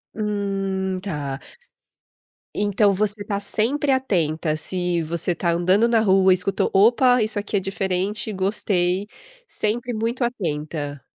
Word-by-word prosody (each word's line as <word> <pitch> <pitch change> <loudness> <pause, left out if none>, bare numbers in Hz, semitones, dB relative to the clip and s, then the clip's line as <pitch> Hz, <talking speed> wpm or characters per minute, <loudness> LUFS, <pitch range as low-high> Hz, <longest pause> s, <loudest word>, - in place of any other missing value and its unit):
Hum, 195 -3 -2
tá. 145 -8 -4 1.2
Então, 205 0 +2
você 205 +1 0
está 200 -1 -2
sempre 255 +8 +1
atenta, 165 - 0
se 175 +1 -1
você 170 +2 -2
está 170 0 -1
andando 185 +7 +3
na 230 -1 +3
rua, 190 -2 +4
escutou, 185 +1 +1
opa, 245 +5 +4
isso 215 -1 -1
aqui 205 0 -2
é - - +2
diferente 195 +2 -2
gostei, 190 -1 0 0.4
sempre 235 - -2
muito 230 +3 -2
atenta? 150 - -3
195 Hz, 125 wpm, -22 LUFS, 180-215 Hz, 1.2 s, rua